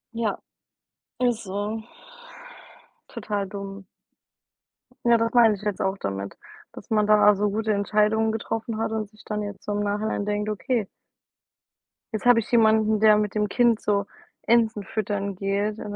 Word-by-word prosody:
Ja, 225 -3 -1 0.8
Ist 245 -3 0
so. 205 +3 -4 1.2
Total 205 -2 -3
dumm. 195 0 -8 1.2
Ja, 235 -1 +5
das 230 0 -1
meine 230 -3 +6
ich 195 - -13
jetzt 210 -2 -2
auch 190 +1 0
damit, 100 - -5 0.3
dass - - -12
man 215 -1 +2
da 210 0 +5
so 205 +1 0
gute 215 +1 -1
Entscheidungen 215 +2 +2
getroffen 225 0 -4
hat 220 0 -2
und 215 -2 -3
sich 215 0 -20
dann 210 0 -3
jetzt 205 -1 -7
so 205 - -2
im 205 - -1
Nachhinein 205 0 -2
denkt: 210 0 -1
„Okay“ 215 +1 -1 1.3
„Jetzt 220 - -4
habe 245 -1 +7
ich 230 - -6
jemanden, 220 -2 +4
der 215 0 +6
mit 210 -1 -1
dem 210 -1 0
Kind 235 0 +2
so 200 -1 0 0.4
Enten 225 -3 +2
füttern 200 -1 -3
geht 200 +3 -2
und 205 -1 -6
210 Hz, 160 wpm, -24 LUFS, 205-220 Hz, 1.3 s, habe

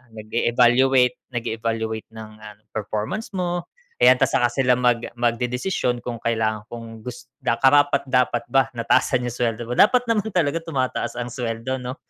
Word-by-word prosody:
nag-e-evaluate 120 +3 +3 0.2
nag-evaluate 115 -1 -3
ng 110 -1 -8 0.2
ah, 105 - -10 0.2
performance 110 - -4
mo. 175 -1 -2 0.3
'Yan - - +7
'tas - - +2
saka 120 - +4
sila 125 -1 +2
mag 120 -2 +2 0.2
magdedesisyon 125 +3 -1
kung 120 -2 -5
kailangan 110 -2 0
kung 115 -1 -8
gus 125 0 -8 0.2
karapatdapat 135 -2 +2
ba 135 -1 +4
na 115 - -3
taasan 125 -2 +2
yung - - -3
sweldo 115 -1 -2
mo, 125 - -3
dapat 245 - +5
naman 220 -2 +1
talaga 165 -1 +1
tumataas 130 -6 -2
ang 120 - -3
sweldo 120 +2 -3
no? 125 +1 -6
125 Hz, 150 wpm, -22 LUFS, 115-135 Hz, 0.3 s, Yan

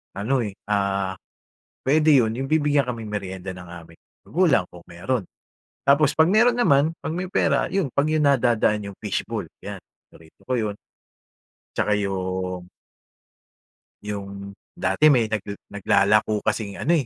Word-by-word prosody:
Ano, 120 +6 0
eh, 105 - -4 0.2
ah, 100 -2 0 0.7
puwede 155 +3 +3
yun, 110 -3 +2
yung 135 +3 -4
bibigyan 145 -4 +2
kaming 115 -3 -5
merienda 95 -2 -5
ng 90 -1 -11
aming 85 -1 -12 0.3
magulang 165 - +2
kung 90 - -11
meron. 100 +7 -2 0.6
Tapos 140 +1 +4
'pag 160 +1 +4
meron 230 +5 +5
naman, 155 - +3
'pag 160 - -3
may 180 - -2
pera, 185 - +1
'yon, 190 -7 -1
'pag 140 +3 +1
yung 155 - +2
nadadaan 115 -5 +2
yung 100 -1 -8
fish - - -2
ball - - -4
'yan, - - -8 0.2
paborito 80 -1 -20
ko 130 - -2 0.2
yun. 100 - -6 1.0
Tsaka 105 - +1
yung 95 -2 -3 1.4
yung 100 -1 -7 0.2
dati, 95 +12 +2
may 115 -4 +2
nagle 105 -2 -3
naglalako 100 +1 +2
kasing 105 -2 -2
ano, 170 +3 +3
105 Hz, 145 wpm, -23 LUFS, 100-140 Hz, 1.4 s, meron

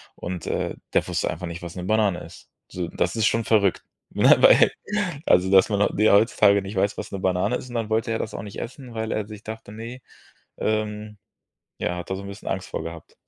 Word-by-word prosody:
Und, 90 -1 -6
äh, - - -2 0.2
der - - +2
wusste - - -1
einfach 90 - -6
nicht, 85 +1 -7
was 85 -1 -7
'ne 90 -1 -5
Banane 105 -3 +2
ist. - - -13 0.2
So, 90 -2 -4
das - - -1
ist 110 -1 +3
schon 115 0 0
verrückt. 100 -4 +2 0.3
Ne, - - +6
weil - - +7 0.6
also 90 +1 +4
dass 95 +2 +6
man 100 -1 0
heu - - +2
die 110 +1 +4
heutzutage 100 -1 +5
nicht 100 +2 -7
weiß, 100 +2 +1
was - - -6
'ne 100 - -4
Banane 95 +5 +1
ist. 125 - -6
Und 120 - -8
dann 115 -2 -2
wollte 115 +1 0
er 110 - -1
das 110 - -4
auch - - -5
nicht 100 -2 -8
essen, 125 0 -8
weil 110 0 -3
er 105 -1 -2
sich 105 -1 -10
dachte: 110 -1 -8
„Ne.“ 115 +4 -8 0.6
Ähm, 105 0 -2 0.6
ja, 90 - -2
hat 90 - -8
da - - 0
so 100 - -7
'n 100 - -8
bisschen 100 +2 -8
Angst 95 0 -3
vor - - -4
gehabt. 85 -1 -9
105 Hz, 235 wpm, -24 LUFS, 95-110 Hz, 0.6 s, weil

